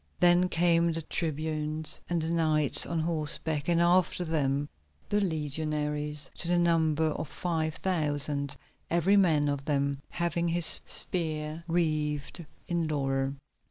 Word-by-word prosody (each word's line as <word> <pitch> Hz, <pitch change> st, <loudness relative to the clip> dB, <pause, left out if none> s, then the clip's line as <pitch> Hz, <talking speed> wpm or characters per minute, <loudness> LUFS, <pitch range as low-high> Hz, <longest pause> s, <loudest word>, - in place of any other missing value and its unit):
Then 175 Hz, +1 st, +4 dB
came 170 Hz, 0 st, +3 dB
the 165 Hz, 0 st, -3 dB
tribunes 155 Hz, -1 st, -2 dB
and 175 Hz, -1 st, 0 dB
the 160 Hz, -, -2 dB
knights 155 Hz, -3 st, +3 dB
on 165 Hz, -, -2 dB
horseback, 155 Hz, -2 st, -2 dB
and 170 Hz, -1 st, +2 dB
after 175 Hz, +1 st, +2 dB
them 145 Hz, -3 st, -1 dB, 0.4 s
the 205 Hz, 0 st, +1 dB
legionaries 150 Hz, -3 st, -2 dB
to -, -, -4 dB
the 175 Hz, 0 st, +2 dB
number 160 Hz, -2 st, +2 dB
of 155 Hz, 0 st, -4 dB
five 160 Hz, -1 st, -3 dB
thousand, 145 Hz, -5 st, -1 dB, 0.3 s
every 175 Hz, +4 st, +2 dB
man 160 Hz, -7 st, +3 dB
of 140 Hz, -1 st, -3 dB
them 140 Hz, -2 st, -1 dB
having 170 Hz, 0 st, -2 dB
his 170 Hz, 0 st, +8 dB
spear 155 Hz, -2 st, -2 dB
wreathed 155 Hz, -1 st, -1 dB, 0.2 s
in 170 Hz, -2 st, -1 dB
laurel. 135 Hz, -2 st, -1 dB
155 Hz, 130 wpm, -28 LUFS, 150-170 Hz, 0.4 s, his